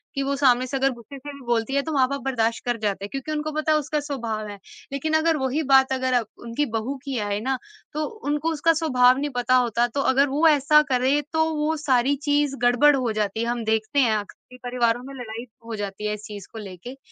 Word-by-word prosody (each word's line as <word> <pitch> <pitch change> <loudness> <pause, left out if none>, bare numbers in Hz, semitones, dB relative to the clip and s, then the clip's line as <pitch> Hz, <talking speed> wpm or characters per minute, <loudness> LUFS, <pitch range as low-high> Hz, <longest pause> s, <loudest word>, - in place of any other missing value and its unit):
कि 275 - 0
वो 280 +1 -1
सामने 255 -3 +3
से 270 - -4
अगर 270 0 +2
गुस्से 240 +3 -11
से 285 +2 -9
भी 280 - -12
बोलती 235 +2 0
है 280 - +3
तो - - -1
माँ-बाप 275 0 +1
बर्दाश्त 230 -4 0
कर 240 -1 0
जाते 200 -1 -1
हैं - - -9
क्योंकि 275 +3 -5
उनको 305 0 -2
पता 310 +1 0
है 310 - +5
उसका 300 0 -1
स्वभाव 230 -7 -4
है। 205 -1 -8 0.3
लेकिन 280 +3 -2
अगर 315 0 +3
वही 265 +3 -1
बात 265 0 +6
अगर 255 -1 +1 0.2
उनकी 235 +5 -1
बहू 235 +5 -2
की 275 -3 -3
आए 205 0 -1
ना 260 +4 -1 0.4
तो 305 0 -1 0.2
उनको 295 +2 0
उसका 330 +2 +3
स्वभाव 255 -6 +4
नहीं 290 +2 -1
पता 250 +1 +2
होता 240 -1 +2
तो 275 +4 -2
अगर 275 +2 +4
वो 300 +4 +3
ऐसा 300 0 +5
करे 265 +3 +2
तो 320 0 +3
वो 300 +1 0
सारी 275 -2 +2
चीज़ 290 -1 +2
गड़बड़ 245 +4 +5
हो 250 -4 0
जाती 215 0 -1
है, - - -1
हम 240 0 -2
देखते 220 +6 0
हैं 230 -5 +3
अक्सर 210 +4 -10
ही 250 - -11
परिवारों 245 -1 0
में 275 +2 -9
लड़ाई 235 -1 -7 0.2
हो 230 -1 -5
जाती 205 0 -5
है 210 - -1
इस 210 0 -7
चीज़ 205 -2 -9
को 225 - -8
लेके। 205 +6 -9
260 Hz, 240 wpm, -24 LUFS, 230-290 Hz, 0.4 s, बात